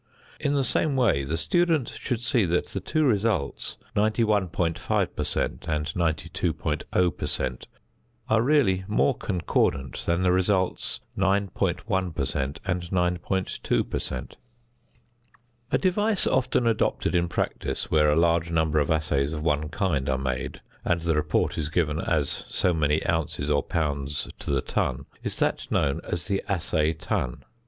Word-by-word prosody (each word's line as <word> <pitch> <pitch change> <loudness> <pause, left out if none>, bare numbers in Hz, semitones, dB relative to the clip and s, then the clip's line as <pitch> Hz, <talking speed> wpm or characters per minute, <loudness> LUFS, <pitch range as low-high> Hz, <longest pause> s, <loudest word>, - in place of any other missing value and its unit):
In 145 0 0
the 140 - +2
same 140 +3 +1
way 120 - +3
the 75 +5 -2
student 165 - +2
should 120 -4 -3
see 120 -1 +2
that 85 +1 0
the 95 - -3
two 155 - 0
results, 105 - 0 0.2
91.5 105 -6 +1
per - - -1
cent. - - -2
and 75 -1 0
92.0 85 0 0
per - - -3
cent., 65 -2 -1 0.6
are 110 0 +3
really 120 -9 +3
more 115 +5 +2
concordant 75 - -1
than 85 +2 +2
the 90 - +4
results 95 0 +1
9.1 95 -1 0
per 70 - 0
cent. 70 +1 -2
and 90 -1 0
9.2 90 +1 0
per - - -2
cent. 65 -1 -5 1.3
A - - +4
device 205 +2 +1
often 130 -1 +2
adopted 115 -2 +1
in 85 -1 +2
practice 65 -5 -2
where 75 -1 +4
a 75 - +3
large 85 0 +2
number 80 -2 +2
of 70 - 0
assays 75 -3 +1
of 75 -1 -4
one 75 -1 +1
kind 80 -6 0
are 65 - +1
made, 65 -1 -3 0.2
and 85 -1 +1
the 85 0 +1
report 75 +1 +1
is 75 -1 -2
given 80 -2 0
as 75 -4 0
so 90 - +2
many 75 -1 +1
ounces 75 -2 -1
or 70 - +3
pounds 75 -4 -2
to - - -6
the 70 -2 +2
ton, 65 +1 -1 0.2
is - - -4
that - - 0
known 70 -1 +1
as 85 0 -3
the 100 -2 -1
assay 80 -5 +1
ton. 80 -6 -3
85 Hz, 155 wpm, -26 LUFS, 75-100 Hz, 1.3 s, the